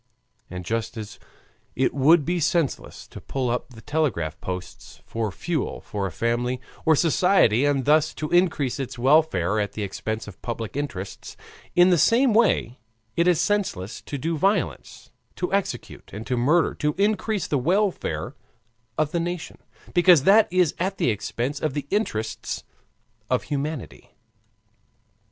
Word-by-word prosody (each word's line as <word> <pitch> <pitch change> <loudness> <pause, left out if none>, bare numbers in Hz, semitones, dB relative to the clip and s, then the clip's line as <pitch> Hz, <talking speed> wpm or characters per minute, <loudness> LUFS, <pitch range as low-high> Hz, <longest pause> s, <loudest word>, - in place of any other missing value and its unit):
And 90 -1 -7
just 115 +3 -3
as 105 -2 -8 0.6
it 130 0 +1
would 145 +3 +4
be 175 +1 0
senseless 165 -2 -1
to - - -10
pull 130 -3 -2
up 125 - -3
the 110 - -12
telegraph 145 - -1
posts 90 0 -7
for 115 -2 -3
fuel 155 - -3
for 100 -2 -4
a - - -6
family 120 +7 -1 0.3
or 160 - +6
society 160 - +3
and 140 -3 +1
thus 155 +1 +3
to 155 - -3
increase 165 -7 +2
its 130 -2 -5
welfare 120 - +3
at 105 -1 -2
the 105 - -4
expense 110 +3 -4
of 105 - -12
public 115 -1 -5
interests, 140 -10 -5 0.4
in 175 +1 +6
the 175 - +4
same 240 - +4
way 205 - +2 0.4
it 170 +1 +2
is 175 -3 +4
senseless 175 - -1
to 145 - -6
do 160 +5 -2
violence, 195 +5 -1 0.2
to 180 +1 -3
execute, 200 -1 -3
and 105 +3 -7
to 125 - -1
murder 150 +8 +3
to 150 0 -1
increase 205 0 0
the 145 - 0
welfare 190 +8 0 0.6
of 155 -1 +1
the 170 - 0
nation, 170 0 -4 0.3
because 175 -5 +6
that 205 +3 +5
is 180 -4 +3
at 190 +2 -1
the 125 - +2
expense 120 +7 -3
of 155 -3 -1
the 145 -2 -3
interests 110 - -2 0.7
of 125 - +1
humanity. 150 0 -5
145 Hz, 155 wpm, -24 LUFS, 115-175 Hz, 0.7 s, or